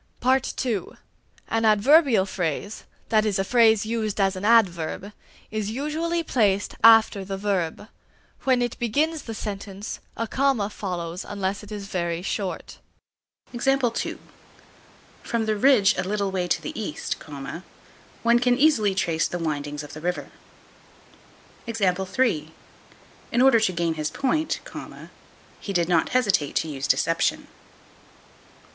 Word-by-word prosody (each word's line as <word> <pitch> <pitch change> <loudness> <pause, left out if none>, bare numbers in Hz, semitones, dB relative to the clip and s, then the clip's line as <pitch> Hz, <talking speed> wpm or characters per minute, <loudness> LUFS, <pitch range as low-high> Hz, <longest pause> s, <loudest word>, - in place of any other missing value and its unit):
(2) 220 -9 -3 0.5
An 225 0 0
adverbial 225 - +5
phrase, 190 +2 -4 0.2
that 215 -1 +3
is 210 -3 0
a 195 - +1
phrase 220 -1 +4
used 220 -2 -2
as 195 -1 +2
an 185 - -6
adverb, 200 -3 +2 0.4
is 215 -1 -2
usually 315 +7 -2
placed 205 -9 +1
after 225 -3 +6
the 195 0 -5
verb; 195 -1 -2 0.6
when 255 -2 +3
it 240 - -4
begins 300 +7 0
the 225 - -7
sentence, 200 -1 -6 0.2
a 230 - -1
comma 255 -4 0
follows 180 -3 -4
it - - -14
unless 200 -1 -2
it 210 0 -13
is 205 -1 -5
very 170 -3 -2
short. 195 -1 -4 0.8
From 270 +3 +2 1.7
the 215 0 0
ridge 215 -2 +4
a - - -1
little 200 +1 -1
way 180 -2 -1
to - - +1
the - - -6
east, 150 -8 -4 1.1
one 235 +1 +4
can 245 0 +2
easily 230 -10 +3
trace 165 -4 +1
the 175 - -4
windings 150 -2 -3
of 145 - -10
the 155 - -8
river. 180 +2 -3 1.4
In 190 - -3
order 265 -4 +6
to 220 -4 +1
gain 170 -2 -1
his 155 -1 -2
point, 310 +4 -1 1.0
he 200 - -5
did 170 -2 +1
not 170 -3 +2
hesitate 200 - +1
to - - +1
use 135 -3 -4
deception. 165 0 +1
205 Hz, 130 wpm, -24 LUFS, 180-230 Hz, 1.7 s, after